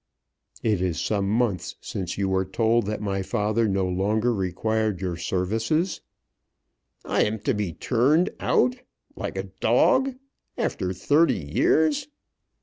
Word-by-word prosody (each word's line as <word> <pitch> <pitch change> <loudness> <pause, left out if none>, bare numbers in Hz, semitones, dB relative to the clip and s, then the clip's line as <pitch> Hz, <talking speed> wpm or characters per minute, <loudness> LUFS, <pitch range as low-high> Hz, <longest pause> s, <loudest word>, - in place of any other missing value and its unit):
"It 105 -5 +1
is 90 -4 -1
some 100 -2 0
months 110 -3 0
since 90 -3 -5
you 100 -1 0
were 95 0 +1
told 115 +2 +1
that 105 +1 -3
my 95 -1 -1
father 105 +4 0
no 95 -2 0
longer 105 +6 +1
required 110 +1 -1
your 90 -2 -2
services." 110 - -1 1.0
"I - - +2
am 110 +1 -1
to - - +1
be 105 -5 -2
turned 135 - +2
out, 255 0 +2 0.4
like - - -5
a - - -1 0.2
dog, 265 0 +3 0.4
after 90 - -1
thirty 145 - +3
years!" 145 - +1
105 Hz, 135 wpm, -25 LUFS, 95-115 Hz, 1.0 s, dog